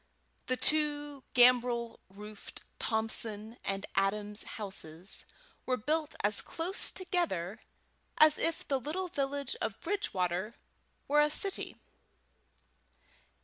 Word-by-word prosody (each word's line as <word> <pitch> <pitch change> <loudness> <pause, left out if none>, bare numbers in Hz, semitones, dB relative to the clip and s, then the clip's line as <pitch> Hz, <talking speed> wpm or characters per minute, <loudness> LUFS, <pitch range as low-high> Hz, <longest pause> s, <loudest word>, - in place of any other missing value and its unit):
The 255 - +1
two 290 -1 +2
gambrel 245 -1 +4
roofed 210 +2 -9 0.2
Thompson 220 0 -1
and 195 0 -2
Adams 205 +2 0 0.2
houses 190 -3 -5 0.4
were 255 -1 +1
built 305 +6 -1
as 205 0 +2
close 345 +4 0
together 315 - -2 0.6
as 310 0 +6
if 330 - -1
the 275 -2 +1
little 355 +8 -3
village 280 -3 -2
of 210 - -2
Bridgewater 190 - -2 0.5
were 295 +1 +4
a 300 - +4
city. 390 +5 +2
245 Hz, 105 wpm, -32 LUFS, 210-300 Hz, 0.6 s, as